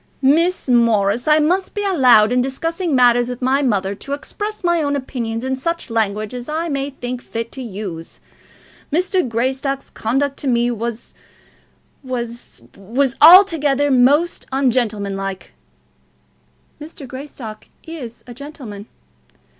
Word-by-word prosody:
"Miss 335 +7 +2
Morris, 230 -2 +2
I 305 0 +5
must 360 +5 0
be 410 - -2
allowed, 250 - +5
in 250 0 +2
discussing 330 +5 -2
matters 245 -1 +4
with 250 -1 -5
my 265 +2 +1
mother, 200 -7 0
to 275 +7 -7
express 415 +9 -5
my 345 -1 +2
own 285 -1 0
opinions 240 -3 -4
in 265 0 -1
such 335 0 -4
language 215 -1 -1
as 245 +2 -7
I 325 +2 -2
may 275 -1 -2
think 250 -2 -6
fit 230 -1 -5
to 265 - -7
use. 190 -8 -7 0.7
Mr. 365 +4 +1
Greystock's 265 +3 -2
conduct 270 +5 -1
to 280 - -5
me 240 -1 +2
was 235 0 -5 0.9
was 240 - -6
was 245 +7 -1
altogether 300 -5 +6
most 285 +7 +3
ungentlemanlike." 205 -8 -1 1.3
"Mr. 300 -2 -10
Greystock 260 -5 -9 0.2
is 280 -9 -9
a 245 - -10
gentleman." 240 -7 -9
260 Hz, 130 wpm, -19 LUFS, 230-295 Hz, 1.3 s, altogether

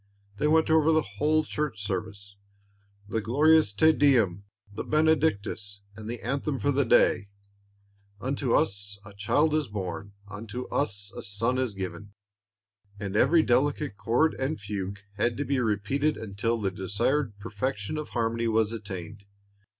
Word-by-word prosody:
They 150 - +1
went 160 +1 +3
over 160 0 +5
the 155 -1 +3 0.2
whole 155 +1 +3
Church 135 -10 -3
service, 100 +1 -5 0.7
the 110 +1 -1
glorious 150 +4 +4
Te 160 +11 +5
Deum, 110 - +3 0.3
the - - -4
Benedictus, 110 -10 +1
and 110 +1 -8
the 120 0 -4
anthem 140 +1 -1
for 125 +5 +1
the 140 +1 +2
day, 110 -2 +3 0.9
"Unto 130 +1 -2
us 100 -1 0
a 100 - -12
Child 145 +10 +2
is 155 -3 +1
born, 100 -1 -5
unto 105 +4 -6
us 100 -8 -2
a - - -5
Son 115 +6 -1
is 125 -6 -1
given," 100 +2 -6 0.8
and 100 -1 -4
every 155 +9 +5
delicate 145 +1 +1
chord 120 +10 +2
and 130 -1 -2
fugue 100 -1 -5 0.2
had 120 -1 +1
to 145 - -2
be 135 0 0
repeated 125 +7 0
until 110 +2 -2
the 100 -3 -1
desired 105 +6 -1
perfection 105 +5 -3
of 150 - -6
harmony 115 0 -1
was 110 -1 +2
attained. 100 -2 -7
115 Hz, 150 wpm, -27 LUFS, 100-145 Hz, 0.9 s, over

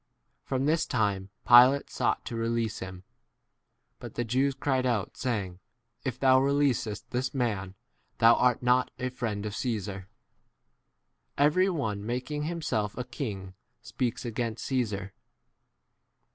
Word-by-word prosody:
From 135 0 -1
this 160 +2 +2
time 100 -5 0 0.2
Pilate 125 +3 +7
sought - - 0
to 120 - -5
release 115 -1 -1
him; 95 -1 -8 1.0
but - - -9
the 120 - 0
Jews 130 +4 +1
cried 130 -2 0
out, 120 -6 -1
saying, 100 -8 -3 0.4
If - - -3
thou 130 -1 +5
releasest 135 -6 0
this 130 +2 -2
[man] 100 -7 -1 0.4
thou 115 0 +7
art 125 0 +2
not 125 +1 +3
a 125 - -2
friend 115 -5 -3
of 105 -1 -4
Caesar. 100 -5 -3 1.3
Every 155 +7 +4
one 110 - -2
making 125 +6 -3
himself 150 -12 -2
a 125 - -2
king 105 -7 -6 0.3
speaks 125 -2 -2
13 120 - -4
against 115 -1 -3
Caesar. 105 -7 -2
120 Hz, 130 wpm, -28 LUFS, 105-130 Hz, 1.3 s, Pilate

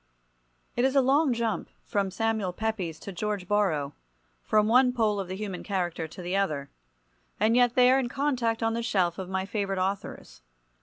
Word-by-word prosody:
V. - - +1
It - - +3
is 265 +1 +1
a - - +7
long 275 +3 +3
jump 230 -2 -1
from 200 -2 -1
Samuel 215 -1 -1
Pepys 190 -6 -3
to 200 - -7
George 200 0 -3
Borrow—from 150 - -1
one 250 +2 +5
pole 215 -4 +1
of 195 - -3
the 185 - -5
human 195 -2 -5
character 175 -4 -2
to 180 +3 -10
the 180 +2 -2
other—and 140 - -3
yet 245 -1 +4
they 250 0 +6
are 265 - +4
in 250 -3 -2
contact 245 -5 0
on 225 0 +1
the 235 - -1
shelf 190 -6 0
of 185 -1 -5
my 190 0 -1
favourite 195 -1 -2
authors. 190 +1 -4
200 Hz, 185 wpm, -27 LUFS, 180-230 Hz, -, a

